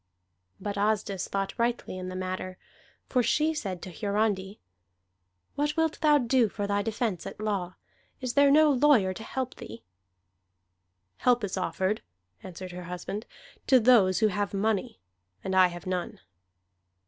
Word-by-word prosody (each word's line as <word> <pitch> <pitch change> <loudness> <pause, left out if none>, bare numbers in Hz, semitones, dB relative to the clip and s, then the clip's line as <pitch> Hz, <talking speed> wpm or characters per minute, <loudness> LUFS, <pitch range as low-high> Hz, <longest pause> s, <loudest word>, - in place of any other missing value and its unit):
But 200 +1 -4
Asdis 205 -2 0
thought 195 0 -2
rightly 235 -4 -1
in 185 0 -5
the 185 - -6
matter. 185 0 -4 0.5
For 250 - +2
she 300 +7 +2
said 190 - -5
to 185 - -7
Hiarandi: 200 +1 -1 0.9
"What 295 +2 -1
wilt 320 -1 0
thou 300 -2 +5
do 245 -3 +2
for 205 0 -4
thy 200 0 0
defence 215 -3 -2
at - - -9
law? 200 -4 -2 0.4
Is 255 -2 -3
there 285 0 +5
no 300 +1 +6
lawyer 255 -8 +4
to 220 - -9
help 260 +2 -4
thee?" 110 +2 -10 1.3
"Help 245 -2 +2
is 200 - -2
offered," 190 +2 -1 0.4
answered 185 0 -8
her 180 0 -8
husband, 180 +5 -6 0.4
"to 260 -2 +6
those 215 -6 +5
who 215 - +5
have 205 +1 -2
money. 200 - -1 0.4
And 190 0 -2
I 185 -1 +7
have 175 +1 -9
none." 185 -1 -3
205 Hz, 150 wpm, -28 LUFS, 185-245 Hz, 1.3 s, I